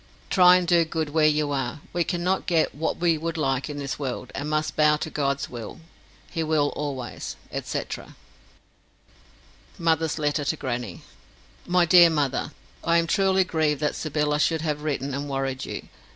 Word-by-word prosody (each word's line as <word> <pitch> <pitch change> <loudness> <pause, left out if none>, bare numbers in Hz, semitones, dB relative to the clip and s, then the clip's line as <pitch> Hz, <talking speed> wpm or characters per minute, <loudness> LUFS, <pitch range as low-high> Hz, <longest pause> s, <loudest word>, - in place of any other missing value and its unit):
Try 180 -1 +7
and 180 -1 +1
do 170 -1 +5
good 160 -2 -3
where 155 0 +4
you 150 -1 +1
are. 135 +1 -2
We 175 - +1
cannot 180 +2 -1
get 165 -3 +2
what 160 +2 -2
we 170 -2 +2
would 165 +1 -3
like 135 -2 0
in 145 - -5
this 140 -1 -4
world, 130 -2 -4
and 145 +2 -4
must 155 0 -1
bow 150 0 +4
to 155 +1 -5
God's 140 0 -1
will. 120 +6 -8 0.5
He 165 - -2
will 155 -2 +2
always, 135 -4 -5 0.3
&c. - - -2 2.0
Mother's 160 -2 +1
Letter 150 -1 0
to 145 - 0
Grannie 120 - -4 0.6
MY 180 0 +4
DEAR 170 0 +8
MOTHER, 145 -2 -1 0.3
I 170 0 +3
am 170 - +2
truly 190 +2 +3
grieved 155 -5 0
that 150 - +1
Sybylla 150 -1 -1
should 160 +1 +2
have 150 -2 -2
written 140 -2 -2
and 140 +1 -4
worried 135 -1 -2
you. - - -6
150 Hz, 170 wpm, -25 LUFS, 140-165 Hz, 2.0 s, DEAR